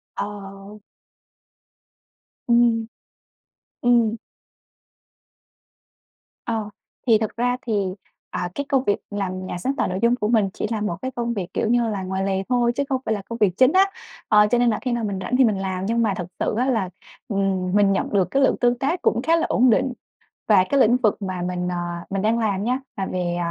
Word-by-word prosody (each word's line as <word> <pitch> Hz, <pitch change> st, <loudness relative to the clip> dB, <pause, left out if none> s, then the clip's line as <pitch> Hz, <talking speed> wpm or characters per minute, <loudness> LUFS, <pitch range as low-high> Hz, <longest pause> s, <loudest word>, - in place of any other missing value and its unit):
Ờ. 200 Hz, 0 st, -7 dB, 1.7 s
Ừm. 235 Hz, -1 st, +3 dB, 1.0 s
Ừm. 235 Hz, -2 st, +3 dB, 2.3 s
Ờ, 220 Hz, -3 st, -2 dB, 0.4 s
thì 225 Hz, -2 st, +6 dB
thực 220 Hz, -1 st, -3 dB
ra 245 Hz, +1 st, 0 dB
thì, 225 Hz, -, -3 dB, 0.6 s
à, 175 Hz, -, -3 dB
cái 285 Hz, -, -3 dB
công 270 Hz, -3 st, +2 dB
việc 205 Hz, -5 st, +2 dB
làm 185 Hz, -2 st, -3 dB
nhà 175 Hz, -, -4 dB
sáng 265 Hz, +10 st, -2 dB
tạo 250 Hz, -, 0 dB
nội 185 Hz, +1 st, -3 dB
dung 235 Hz, +1 st, +4 dB
của 210 Hz, -, -2 dB
mình 215 Hz, -4 st, +2 dB
chỉ -, -, -3 dB
là 215 Hz, -2 st, -1 dB
một 190 Hz, -5 st, -1 dB
cái 260 Hz, -, -3 dB
công 235 Hz, -1 st, -2 dB
việc, 195 Hz, -5 st, -3 dB
kiểu -, -, 0 dB
như 240 Hz, -1 st, +2 dB
là, 200 Hz, -3 st, -3 dB
ngoài 190 Hz, +1 st, -2 dB
lề 195 Hz, 0 st, 0 dB
thôi 240 Hz, -1 st, +2 dB
chứ 280 Hz, -, 0 dB
không 260 Hz, -1 st, 0 dB
phải 220 Hz, -, +1 dB
là 205 Hz, -, -3 dB
công 230 Hz, -, -4 dB
việc 205 Hz, -5 st, +2 dB
chính 255 Hz, +3 st, +5 dB
á, 385 Hz, +1 st, +6 dB, 0.4 s
ờ, 210 Hz, 0 st, +5 dB
cho 245 Hz, -, +4 dB
nên 245 Hz, 0 st, +3 dB
là 215 Hz, -, 0 dB
khi 250 Hz, -, -2 dB
nào 235 Hz, -1 st, -1 dB
mình 200 Hz, -3 st, -2 dB
rảnh 250 Hz, +8 st, -1 dB
thì 265 Hz, -, +6 dB
mình 215 Hz, -4 st, +2 dB
làm. 190 Hz, -1 st, -3 dB
Nhưng 230 Hz, +2 st, +1 dB
mà 210 Hz, -4 st, +2 dB
thật 180 Hz, -, -5 dB
sự -, -, 0 dB
á 250 Hz, -, +2 dB
là, 225 Hz, -8 st, 0 dB, 0.4 s
ừm, 195 Hz, -3 st, -1 dB
mình 205 Hz, -1 st, +4 dB
nhận 195 Hz, -, 0 dB
được 190 Hz, -3 st, +3 dB
cái 275 Hz, 0 st, +3 dB
lượng -, -, +3 dB
tương 245 Hz, 0 st, +2 dB
tác 300 Hz, +8 st, -1 dB
cũng 235 Hz, -, +1 dB
khá 330 Hz, +4 st, +3 dB
là 330 Hz, -, +1 dB
ổn 250 Hz, +1 st, +4 dB
định 250 Hz, +3 st, +2 dB, 0.5 s
và 200 Hz, -4 st, +6 dB
cái 280 Hz, -, +2 dB
lĩnh 240 Hz, 0 st, +5 dB
vực 220 Hz, -4 st, +1 dB
mà 185 Hz, -2 st, -3 dB
mình, 180 Hz, 0 st, -2 dB
à, 175 Hz, -1 st, -4 dB
mình 195 Hz, 0 st, -2 dB
đang 225 Hz, +2 st, +1 dB
làm 205 Hz, -3 st, 0 dB
nhá 250 Hz, +3 st, 0 dB, 0.2 s
là 195 Hz, -, -1 dB
về 175 Hz, -2 st, -2 dB
215 Hz, 210 wpm, -22 LUFS, 195-240 Hz, 2.3 s, thì